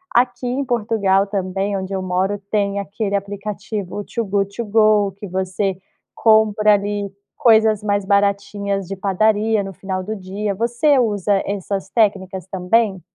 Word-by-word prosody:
Aqui 245 +1 +2
em 255 +3 -1
Portugal 210 -5 +1
também, 195 0 -2
onde 190 0 -5
eu 190 - -2
moro, 185 +2 0
tem 200 -1 0
aquele 200 0 -3
aplicativo 205 0 -4
Too 230 -1 -3
Good 200 0 -1
To 235 - -3
Go 210 -1 +3
que 205 - -7
você 190 +1 -1 0.4
compra 215 -1 +4
ali 205 0 -1 0.3
coisas 220 -5 +4
mais 205 -1 0
baratinhas 200 0 0
de 195 - -4
padaria 210 +2 +1
no 195 0 -7
final 185 +2 -4
do 215 +3 -4
dia. 200 +1 -4
Você 240 +7 +2
usa 205 -4 +1
essas 195 -1 -3
técnicas 190 -5 0
também? 190 +1 +1
200 Hz, 145 wpm, -20 LUFS, 195-215 Hz, 0.4 s, compra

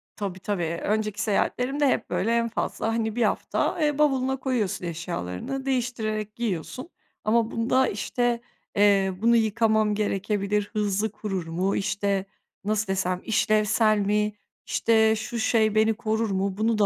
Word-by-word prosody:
Tabii, 195 -3 -4
tabii, 200 -3 -2 0.2
önceki 215 -1 -1
seyahatlerimde 255 +7 +1
hep, - - 0
böyle, 230 - 0
en 230 0 0
fazla, 225 - -2
hani, 225 -1 -1
1 240 - +2
hafta, 275 - 0
eee, 295 -2 +1
bavuluna 265 -3 +2
koyuyorsun 235 -9 -1
eşyalarını, 165 - -4
değiştirerek 220 -5 -2
giyiyorsun. 235 - -4 0.3
Ama 225 +1 +2
bunda, 255 +3 +2
işte, 235 +3 -1 0.3
eee, 200 -2 +4
"Bunu 235 +1 +4
yıkamam 220 -1 +2
gerekebilir, 205 0 -1
hızlı 210 0 0
kurur 195 -5 -4
mu?" 180 +4 0
İşte, 200 -1 0 0.4
nasıl 215 0 0
desem? 185 -1 -1
"İşlevsel 215 0 +2
mi? 210 +1 +1 0.3
İşte, 220 -1 +3
şu 230 +2 -4
şey 220 -1 +2
beni 220 +1 +4
korur 220 0 -1
mu? 195 0 -1
Bunu 220 0 +1
da 205 - +4
215 Hz, 140 wpm, -25 LUFS, 200-230 Hz, 0.4 s, eee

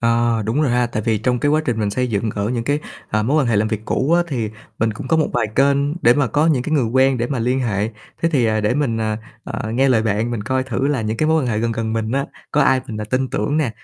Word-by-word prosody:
À, 115 -1 +2
đúng 115 +8 0
rồi 140 - +2
ha. 120 0 +2
Tại 110 -2 -3
vì 110 -1 +1
trong 125 +3 0
cái 145 - +1
quá 155 +1 +3
trình 120 -6 -1
mình 105 -1 0
xây 125 +4 0
dựng 110 0 -1
ở 100 0 -1
những 120 -1 -2
cái, 145 +3 +1 0.3
ờ, 105 0 0
mối 135 +8 +1
quan - - -1
hệ 115 - +2
làm 105 +1 +2
việc 110 -1 -2
cũ 140 +5 0
á 175 0 +5
thì 115 -8 -2 0.3
mình 110 0 +1
cũng 105 - -8
có 165 - +3
một 155 - +2
vài 120 -3 +1
kênh 140 +4 +2
để 120 - +6
mà 145 0 +2
có 150 +6 +1
những 145 -6 +2
cái 155 - -4
người 140 -5 +3
quen 130 +3 +2
để 120 - 0
mà 135 0 -2
liên 125 +3 0
hệ. 105 -4 0 0.3
Thế 165 - +3
thì, 130 -5 +3
à, 110 -1 +1
để 105 +3 +1
mình, 130 -6 0
à, 110 -1 -1 0.3
ờ, 110 - -4
nghe 135 +3 +3
lời 120 -4 +3
bạn, 110 +2 0
mình 115 -3 -3
coi 130 +3 0
thử 130 +1 -1
là 145 -4 0
những 110 0 -2
cái 155 - +1
mối 160 0 +3
quan - - -1
hệ 110 -3 0
gần 115 +1 0
gần 115 -1 -2
mình 110 0 -2
á, 140 +1 0 0.2
có 150 - +3
ai 130 -1 +3
mình, 110 -1 -5
à, - - -3
tin 130 +5 -1
tưởng 125 +8 -1
nè, 150 -6 +1
120 Hz, 310 wpm, -20 LUFS, 110-135 Hz, 0.3 s, để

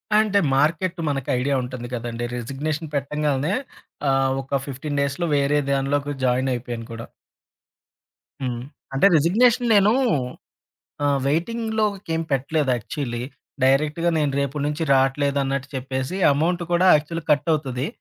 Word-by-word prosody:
అంటే, 210 -2 +4 0.2
మార్కెట్ 170 +5 +1
మనకు 135 -3 -2
ఐడియా 140 +2 +1
ఉంటుంది 125 -1 -6
కదండీ! 120 0 -4
రిజిగ్నేషన్ 150 +5 -4
పెట్టంగానే 145 +2 0 0.6
ఆహ్, 135 0 +2
ఒక 135 +1 -1
15 140 +2 -3
డేస్‌లో 140 +5 -1
వేరే 140 +1 +2
దానిలోకి 140 +1 0
జాయినయిపోయాను 125 -2 -1
కూడా. 115 0 -7 1.4
హ్మ్. 125 -2 -2 0.3
అంటే 135 +8 +3
రిజిగ్నేషన్ 230 - +3
నేను 200 +1 +5 1.1
ఆహ్, 140 -1 +2
వెయిటింగ్ 220 +11 -1
లోకేమి 190 -6 -1
పెట్టలేదు 140 +1 +1
యాక్చువల్లీ. 120 +1 -4 0.4
డైరెక్ట్‌గా 150 +5 +2
నేను 150 -3 +1
రేపటి 140 +1 -1
నుంచి 150 +2 -2
రాట్లేదు 140 +1 +2
అన్నట్టు 135 0 -2
చెప్పేసి, 130 +5 -3 0.2
అమౌంట్ 170 +5 0
కూడా 175 +2 +4
యాక్చువల్లీ 165 +3 -4
కట్ 150 +2 +2
అవుతది. 135 -3 -1
140 Hz, 125 wpm, -23 LUFS, 135-165 Hz, 1.4 s, నేను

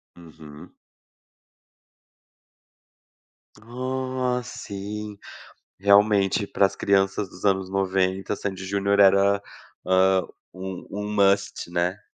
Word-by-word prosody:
Uhum. 80 -3 -14 2.9
Ah, 130 +2 -3
sim, 105 -1 -7 0.6
realmente, 100 0 +3
para 100 - +1
as - - -7
crianças 95 0 +1
dos - - -14
anos 95 -2 +1
90, 95 +1 -1
Sandy 95 -2 -5
e - - -6
Junior 100 +1 +1
era, 100 +1 +5 0.4
hã, 95 0 +3 0.3
um 95 0 -7
um 105 +1 -4
must, 100 -3 +1
né. 90 +3 0
100 Hz, 95 wpm, -24 LUFS, 95-105 Hz, 2.9 s, era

